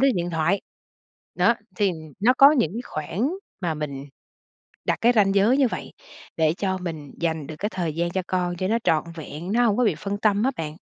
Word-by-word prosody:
đến 270 Hz, -2 st, +4 dB
điện 175 Hz, 0 st, -1 dB
thoại. 170 Hz, +4 st, +1 dB, 0.7 s
Đó, 235 Hz, -, +4 dB, 0.2 s
thì 200 Hz, -2 st, +2 dB, 0.3 s
nó 235 Hz, +5 st, +5 dB
có 275 Hz, +1 st, +9 dB
những 245 Hz, -10 st, +1 dB
khoảng 185 Hz, -, -2 dB, 0.3 s
mà 170 Hz, -3 st, -1 dB
mình 140 Hz, -2 st, -5 dB, 0.8 s
đặt -, -, +1 dB
cái 240 Hz, +1 st, +5 dB
ranh 200 Hz, -3 st, +3 dB
giới 215 Hz, +7 st, +4 dB
như 270 Hz, -3 st, +4 dB
vậy -, -, -6 dB, 0.4 s
để 160 Hz, -1 st, +3 dB
cho 190 Hz, -2 st, -1 dB
mình 160 Hz, -6 st, -6 dB
dành 160 Hz, -4 st, -1 dB
được 155 Hz, -, -7 dB
cái 210 Hz, -, -1 dB
thời 175 Hz, -6 st, -3 dB
gian 170 Hz, +1 st, 0 dB
cho 190 Hz, -, -1 dB
con 180 Hz, -1 st, -1 dB
cho 185 Hz, +2 st, -1 dB
nó 225 Hz, -, +2 dB
trọn 155 Hz, -9 st, +2 dB
vẹn, 160 Hz, +3 st, -7 dB
nó 240 Hz, +3 st, +3 dB
hổng 210 Hz, -3 st, +2 dB
có 250 Hz, -, +3 dB
bị 195 Hz, -, +2 dB
phân 200 Hz, +4 st, -4 dB
tâm 210 Hz, 0 st, +2 dB
á 265 Hz, -, +2 dB
bạn. 155 Hz, -1 st, -4 dB
185 Hz, 215 wpm, -24 LUFS, 160-215 Hz, 0.8 s, có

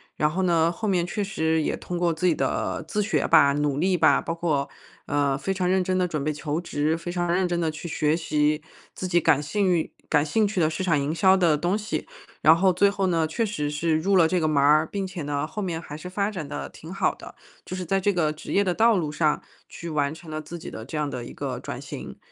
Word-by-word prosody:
然 150 Hz, -, +2 dB
后 190 Hz, +3 st, -1 dB
呢， 170 Hz, -2 st, +3 dB
后 215 Hz, +5 st, -4 dB
面 180 Hz, -3 st, +1 dB
确 205 Hz, +3 st, -2 dB
实 160 Hz, -4 st, 0 dB
也 -, -, -1 dB
通 175 Hz, -, -5 dB
过 175 Hz, -1 st, +1 dB
自 160 Hz, +3 st, -3 dB
己 175 Hz, -, +5 dB
的 -, -, -2 dB
自 210 Hz, -, 0 dB
学 215 Hz, -, 0 dB
吧、 140 Hz, 0 st, +6 dB
努 145 Hz, -1 st, 0 dB
力 185 Hz, +4 st, +2 dB
吧， -, -, +4 dB
包 165 Hz, -, -3 dB
括， 155 Hz, -4 st, -1 dB, 0.4 s
呃， 140 Hz, -1 st, +1 dB
非 195 Hz, -, -2 dB
常 185 Hz, -1 st, -1 dB
认 190 Hz, 0 st, +2 dB
真 185 Hz, 0 st, -1 dB
地 185 Hz, -1 st, +2 dB
准 155 Hz, -5 st, -3 dB
备 155 Hz, -, 0 dB
求 150 Hz, +1 st, -3 dB
职、 160 Hz, -2 st, -1 dB
非 170 Hz, +1 st, -6 dB
常 175 Hz, -1 st, -1 dB
认 185 Hz, +1 st, +2 dB
真 175 Hz, -1 st, -1 dB
地 160 Hz, -, +1 dB
去 155 Hz, +2 st, -7 dB
学 155 Hz, 0 st, +1 dB
习 150 Hz, -2 st, 0 dB, 0.3 s
自 185 Hz, -, -4 dB
己 175 Hz, -1 st, +3 dB
感 145 Hz, -1 st, +3 dB
兴 195 Hz, +6 st, 0 dB
运 170 Hz, -3 st, 0 dB, 0.2 s
感 150 Hz, -1 st, +3 dB
兴 210 Hz, +8 st, +2 dB
趣 200 Hz, -2 st, -2 dB
的 160 Hz, -2 st, +2 dB
市 190 Hz, -, -3 dB
场 165 Hz, -6 st, +2 dB
营 140 Hz, +2 st, -1 dB
销 190 Hz, +3 st, +4 dB
的 170 Hz, -4 st, +3 dB
东 175 Hz, +6 st, 0 dB
西。 215 Hz, 0 st, -4 dB, 0.3 s
然 160 Hz, +2 st, +7 dB
后 185 Hz, +1 st, +3 dB
最 200 Hz, +3 st, +4 dB
后 195 Hz, -1 st, -1 dB
呢， 165 Hz, -3 st, +1 dB
确 225 Hz, +9 st, -1 dB
实 150 Hz, -9 st, -2 dB
是 155 Hz, +2 st, 0 dB
入 195 Hz, +4 st, +1 dB
了 170 Hz, -3 st, +6 dB
这 180 Hz, +2 st, +1 dB
个 160 Hz, -, +1 dB
门 155 Hz, -2 st, 0 dB
儿， 155 Hz, +2 st, +5 dB
并 195 Hz, -1 st, -3 dB
且 185 Hz, -2 st, -6 dB
呢 145 Hz, 0 st, -2 dB
后 160 Hz, +7 st, -5 dB
面 170 Hz, -4 st, -2 dB
还 150 Hz, -3 st, -9 dB
是 170 Hz, +4 st, -8 dB
发 200 Hz, +3 st, -1 dB
展 170 Hz, -7 st, -5 dB
得 145 Hz, +1 st, -5 dB
挺 160 Hz, -, -11 dB
好 195 Hz, -, +1 dB
的。 -, -, -12 dB, 0.3 s
就 -, -, -6 dB
是 185 Hz, -1 st, -4 dB
在 195 Hz, +3 st, +1 dB
这 205 Hz, +2 st, +2 dB
个 160 Hz, -5 st, 0 dB
职 155 Hz, -, -7 dB
业 200 Hz, -, +4 dB
的 180 Hz, -3 st, 0 dB
道 225 Hz, +1 st, +4 dB
路 155 Hz, -4 st, -1 dB
上 155 Hz, -1 st, +1 dB, 0.3 s
去 170 Hz, -, -8 dB
完 145 Hz, -2 st, 0 dB
成 160 Hz, -1 st, -11 dB
了 155 Hz, -, -4 dB
自 165 Hz, +3 st, -8 dB
己 165 Hz, -, -8 dB
的 110 Hz, -, -7 dB
这 135 Hz, +6 st, -6 dB
样 150 Hz, -1 st, 0 dB
的 125 Hz, -4 st, -5 dB
一 -, -, -9 dB
个 -, -, -4 dB
转 -, -, -6 dB
型， -, -, -8 dB
165 Hz, 290 characters per minute, -25 LUFS, 150-185 Hz, 0.4 s, 然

